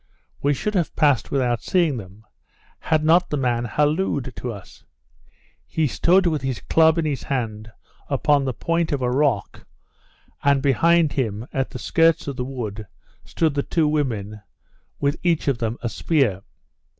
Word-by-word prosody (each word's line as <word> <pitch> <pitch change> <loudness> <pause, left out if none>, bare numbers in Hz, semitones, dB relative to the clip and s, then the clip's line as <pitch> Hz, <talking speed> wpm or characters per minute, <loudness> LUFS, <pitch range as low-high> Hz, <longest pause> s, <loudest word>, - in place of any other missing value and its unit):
We 145 0 +2
should 210 +9 -3
have 175 -5 -1
passed 145 -7 +2
without 125 -4 0
seeing 170 -7 +1
them, 105 +1 -11 0.5
had 155 -1 0
not 170 +3 +4
the 150 - -1
man 120 -3 0
hallooed 145 - 0
to 125 - -4
us. 100 -4 -12 0.8
He 160 - 0
stood 180 +7 +3
with 155 -4 0
his 130 -3 -3
club 160 0 +3
in 165 - 0
his 145 -3 -2
hand 110 -4 -4 0.4
upon 145 -2 +2
the 135 - -1
point 165 +7 -1
of 140 -3 -1
a 125 - +1
rock, 130 -6 -1 0.8
and 140 -1 +4
behind 165 +3 +3
him, 110 -5 -2
at 135 -1 -1
the - - -7
skirts 165 +4 +2
of 140 - -3
the 125 - -3
wood, 115 -5 -6 0.4
stood 160 -3 0
the 140 - 0
two 160 +2 0
women, 110 -9 -2 0.6
with 145 +2 0
each 170 -4 0
of 135 -4 +1
them 115 +1 -2
a 120 - -1
spear. 125 - 0
140 Hz, 165 wpm, -22 LUFS, 120-155 Hz, 0.8 s, not